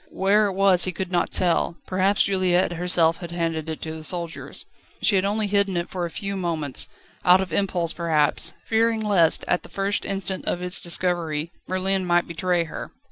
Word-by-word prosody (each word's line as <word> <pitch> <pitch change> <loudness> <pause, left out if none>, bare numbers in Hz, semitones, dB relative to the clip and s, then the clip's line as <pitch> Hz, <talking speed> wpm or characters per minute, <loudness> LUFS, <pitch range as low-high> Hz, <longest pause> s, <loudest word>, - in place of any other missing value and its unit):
Where 205 +2 +2
it 195 - -3
was 190 -2 +4
he 185 - -1
could 185 +1 -5
not 175 -2 +1
tell; 170 -1 +1
perhaps 190 +2 +2
Juliette 185 -2 +2
herself 170 -1 +2
had 175 - -8
handed 165 -2 -2
it 160 - -5
to 160 - -5
the 160 - -9
soldiers. 170 0 -3 0.3
She 205 - +3
had 190 0 +2
only 210 +2 +1
hidden 200 -2 +1
it 170 - -3
for 180 -2 -2
a - - -9
few 200 +3 -4
moments, 165 -7 0 0.4
out 180 +1 +6
of 185 -4 -3
impulse 175 -3 +1
perhaps, 160 -4 0
fearing 225 0 +1
lest, 195 -7 +2
at 180 - +1
the - - -13
first 195 0 -1
instant 195 -1 -4
of - - -1
its 180 0 0
discovery, 170 -3 -1 0.2
Merlin 190 +1 +1
might 175 -1 +2
betray 175 +1 0
her. 160 - -7
180 Hz, 190 wpm, -24 LUFS, 170-195 Hz, 0.4 s, out